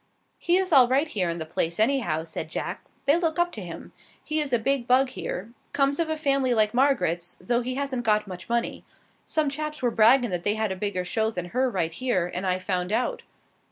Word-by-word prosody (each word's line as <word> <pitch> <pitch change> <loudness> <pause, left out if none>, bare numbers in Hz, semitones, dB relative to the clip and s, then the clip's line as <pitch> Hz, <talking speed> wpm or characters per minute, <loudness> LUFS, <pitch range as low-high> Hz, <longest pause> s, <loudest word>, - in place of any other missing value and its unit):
"He 345 +1 +2
is 380 -1 -1
all 260 -3 +8
right 270 +5 +2
here 190 - -1
in 170 - -3
the 160 - -4
place, 165 +2 -2
anyhow," 220 - +1
said 160 -1 -6
Jack. - - -4 0.2
"They 290 +4 +4
look 330 -2 -1
up 345 0 +2
to 215 - -7
him. 175 -3 -9 0.3
He 310 0 -1
is 295 -3 -1
a 240 - +4
big 255 +1 0
bug 255 +1 +4
here. 205 -3 -5 0.2
Comes 280 +1 +1
of 330 -1 0
a 315 - 0
family 275 -4 +1
like 215 -1 +2
Margaret's, 235 - +1
though 240 +6 0
he 255 +1 -3
hasn't 275 -2 -2
got 215 -2 +2
much 180 -1 -9
money. 235 0 -1 0.4
Some 310 -2 +1
chaps 300 +1 -4
were 240 - +2
braggin' 235 +1 +5
that 175 -1 -1
they 205 +4 +1
had 220 -2 -1
a - - -2
bigger 185 -2 -2
show 220 +4 0
than 180 -5 -5
her 255 +5 +1
right 170 -7 -1
here, 240 -4 0
and 185 +1 -2
I 185 0 +1
found 185 0 -2
out." 245 +3 0
235 Hz, 225 wpm, -26 LUFS, 185-275 Hz, 0.4 s, all